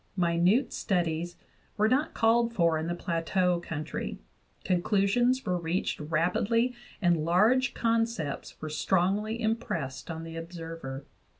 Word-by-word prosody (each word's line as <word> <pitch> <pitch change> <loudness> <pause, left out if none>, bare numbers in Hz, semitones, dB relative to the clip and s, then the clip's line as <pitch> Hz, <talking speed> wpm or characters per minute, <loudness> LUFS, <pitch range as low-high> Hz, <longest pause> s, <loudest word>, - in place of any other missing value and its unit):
Minute 175 +8 +2
studies 175 -3 -1 0.4
were 215 +1 +4
not 275 +7 +1
called 230 +1 +3
for 170 -4 +3
in 160 - -3
the 175 - -1
Plateau 175 +1 0
country; 160 -3 -5 0.5
conclusions 200 +8 +2
were 180 -1 0
reached 170 +2 -1
rapidly 180 +10 +1 0.3
and 170 -3 +3
large 215 - +3
concepts 225 -10 -1
were 155 - -5
strongly 195 +7 +1
impressed 220 - -2
on 165 0 -5
the 165 0 -8
observer. 165 -5 -7
180 Hz, 120 wpm, -29 LUFS, 165-225 Hz, 0.5 s, were